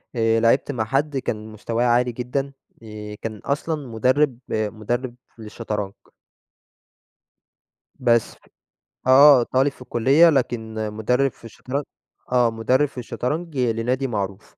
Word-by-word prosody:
آآ، 115 0 +2
لاعبت 115 +5 +2
مع 115 -5 -2
حد 140 +4 0
كان 110 -4 -4
مستواه 115 +2 -2
عالي 125 +1 +2
جدًا 130 +4 -3 0.3
آآ، 105 -1 -8
كان 110 -1 -5
أصلًا 145 0 -2
مدرب 130 +3 +1
مدرب 110 +4 -2 0.2
للشطرنج. 105 -2 -5 2.1
بس، 120 -2 +2 0.7
آه 135 -1 +8
طالب 135 +3 +1
في 130 - -21
الكلية، 135 +8 +4
لكن 120 -6 -1 0.2
مدرب 125 +5 +1
في 115 - -19
الشطرنج 130 +5 -5 0.5
آه، 120 -2 +3
مدرب 125 +6 +2
في 135 - -20
الشطرنج 150 +6 -4
لنادي 125 +2 0
معروف. 100 -4 -4
120 Hz, 120 wpm, -22 LUFS, 110-135 Hz, 2.1 s, آه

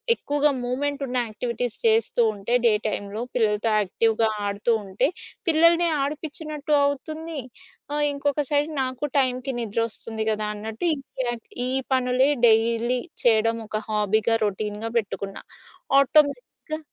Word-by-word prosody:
ఎక్కువగా 290 +1 +2
మూవ్మెంట్ 280 +4 -2
ఉన్న 255 0 -2
యాక్టివిటీస్ 235 +2 -3
చేస్తూ 445 - +3
ఉంటే, 205 +3 -4
డే 225 - +6
టైంలో 205 +1 -4
పిల్లలతో 220 -1 +1
యాక్టివ్‌గా 225 +3 +1 0.2
ఆడుతూ 200 +4 0
ఉంటే, 195 +7 +1 0.4
పిల్లల్ని 335 +2 +5
ఆడిపిచ్చినట్టు 300 +1 -3
అవుతుంది. 310 +3 -3 0.5
ఆహ్, 295 0 +1
ఇంకొక 285 +1 0
సైడ్ 290 +1 +2
నాకు 255 +2 -3
టైంకి 255 0 0
నిద్రొస్తుంది 225 0 -3
గదా! 215 0 -2
అన్నట్టు 220 +10 -4
ఈ - - 0 0.3
యా 240 - 0 0.3
ఈ - - -1 0.2
పనులే 255 +1 +3 0.2
డైలీ 230 +2 +2 0.2
చేయడం 230 0 +3
ఒక 215 0 -3
హాబీగా, 215 +1 +2
రొటీన్‌గా 210 +2 -3
పెట్టుకున్నా. 200 -2 -6 0.6
ఆటోమేటిక్‌గా 285 +2 +1
245 Hz, 120 wpm, -24 LUFS, 220-285 Hz, 0.6 s, డే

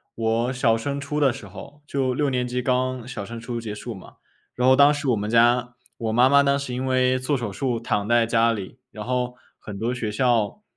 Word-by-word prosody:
我 115 +2 0
小 125 -3 +2
升 140 +5 -3
初 145 +1 -3
的 140 -3 +4
时 135 +2 -9
候。 145 +1 -12
就 135 -3 -1
6 145 +2 +1
年 125 -1 -1
级 125 +1 -2
刚 125 -1 -1
小 125 -5 -6
升 115 +3 -7
初 115 0 -5
结 105 -2 -6
束 115 +3 -7
嘛。 95 - -13 0.4
然 125 +1 +1
后 130 - +7
当 140 +2 +6
时 145 -1 -3
我 120 - +3
们 105 0 -3
家， 120 +1 +3 0.2
我 115 -1 -2
妈 120 +3 +5
妈 140 +1 +5
当 140 0 +2
时 140 -3 -5
因 130 +2 -3
为 130 0 +2
做 135 +2 0
手 115 -5 -4
术 120 +3 -1
躺 105 -3 -1
在 120 0 +3
家 115 0 +3
里。 110 +3 -6
然 105 -5 -8
后 125 0 -2 0.2
很 105 -2 -8
多 115 +4 -1
学 120 -4 -3
校 120 - 0
125 Hz, 245 characters per minute, -23 LUFS, 115-130 Hz, 0.4 s, 后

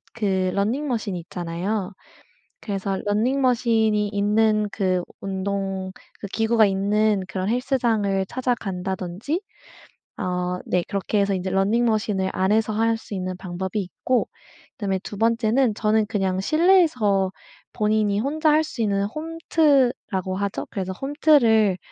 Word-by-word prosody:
그 190 -4 0
러닝 240 +9 0
머신 220 -6 -2
있잖아요. 180 +4 -4 0.7
그래서 195 -2 -3
러닝 225 +7 +1
머신이 225 -4 +2
있는 210 +1 +2
그 185 -3 0 0.2
운동 195 -1 -3 0.3
그 205 - -5
기구가 225 +1 +3
있는 200 +1 +1
그런 185 +2 -3
헬스장을 230 -6 +1
찾아간다든지 195 - -3 0.8
아 180 0 -2
네 180 -1 +1
그렇게 200 +1 -1
해서 200 0 +1
이제 185 +1 -3
러닝 200 +5 +2
머신을 210 -4 0
안에서 215 +3 +1
할 225 +1 +1
수 220 - -9
있는 185 -1 -3
방법이 190 +2 -4
있고 235 +7 -1 0.4
그다음에 195 -3 -2
2 205 - -7
번째는 230 +1 +2
저는 215 0 +1
그냥 190 -3 -1
실내에서 280 - +3 0.4
본인이 210 -1 +1
혼자 305 +6 +1
할 310 +1 +4
수 235 -6 -4
있는 200 -1 +1
홈트라고 275 - 0
하죠. 200 0 -3
그래서 190 -3 -3
홈트를 240 - +3
210 Hz, 280 characters per minute, -23 LUFS, 190-230 Hz, 0.8 s, 할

